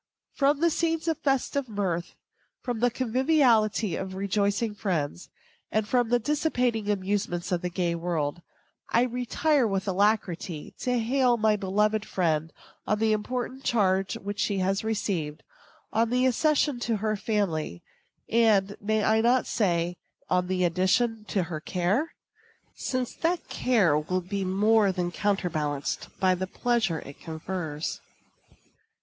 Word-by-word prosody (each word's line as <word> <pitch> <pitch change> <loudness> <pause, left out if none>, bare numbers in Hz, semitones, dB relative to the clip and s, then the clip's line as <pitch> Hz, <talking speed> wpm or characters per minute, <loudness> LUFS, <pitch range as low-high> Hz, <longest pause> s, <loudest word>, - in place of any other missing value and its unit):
From 285 +1 +2
the 335 0 +4
scenes 330 0 0
of 325 -2 0
festive 275 -1 0
mirth, 180 -5 -2 0.5
from 245 -3 -2
the 245 +2 +3
conviviality 240 - +2
of 190 0 -5
rejoicing 200 +3 0
friends, 165 - -2 0.4
and 215 -1 0
from 245 0 +2
the 245 - +4
dissipating 245 -5 0
amusements 190 -2 -1
of 175 -2 0
the 180 - -2
gay 175 -1 -1
world, 165 -2 -2 0.5
I 235 - +4
retire 250 +3 +1
with 195 0 -2
alacrity, 185 -5 0
to 250 -1 0
hail 245 +1 +2
my 215 -1 +3
beloved 210 +2 +1
friend 160 -5 0 0.4
on 210 - +2
the 220 0 +2
important 250 +5 -3
charge 195 -4 +1
which 205 +1 -6
she 200 - +1
has 195 +2 0
received; 190 -9 -2 0.5
on 225 +1 +2
the 250 +1 +2
accession 290 +1 +2
to 230 -2 0
her 215 +1 -1
family, 195 - -2 0.4
and, 210 -4 +3
may 215 +1 +1
I 220 +1 +3
not 245 +2 +3
say, 175 -4 0 0.3
on 180 0 +2
the 185 0 0
addition 210 +6 +1
to 195 -3 0
her 165 -2 -5
care? 190 - -1 0.6
since 255 -2 -3
that 340 +1 -1
care 210 -12 +2
will 180 +4 -1
be 195 +2 -3
more 205 +2 +3
than 180 -1 -2
counterbalanced 165 -8 -1
by 185 -1 +4
the 185 +1 -3
pleasure 220 -6 0
it 140 - -11
confers. 160 -1 -4
205 Hz, 140 wpm, -27 LUFS, 180-240 Hz, 0.6 s, the